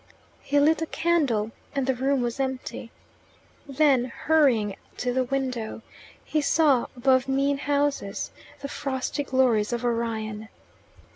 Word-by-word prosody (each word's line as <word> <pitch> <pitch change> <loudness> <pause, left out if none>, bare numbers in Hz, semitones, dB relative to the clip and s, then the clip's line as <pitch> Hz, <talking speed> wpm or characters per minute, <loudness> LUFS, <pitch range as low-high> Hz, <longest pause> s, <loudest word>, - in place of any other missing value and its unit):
He 285 - +1
lit 315 +3 +3
a 325 - -1
candle, 275 -13 +1 0.2
and 275 -2 0
the 265 - +2
room 265 +1 0
was 240 +2 -3
empty. 260 -3 -4 0.8
Then, 275 -3 +3
hurrying 250 -7 +2 0.2
to 245 0 -1
the 260 0 +2
window, 250 -4 -3 0.4
he 305 - 0
saw 290 -4 +3
above 260 +1 +3
mean 275 +1 +1
houses 285 -7 -1 0.3
the 280 - -4
frosty 275 0 -3
glories 250 -6 +2
of 240 0 -2
Orion. 220 -2 -2
265 Hz, 130 wpm, -26 LUFS, 235-280 Hz, 0.8 s, lit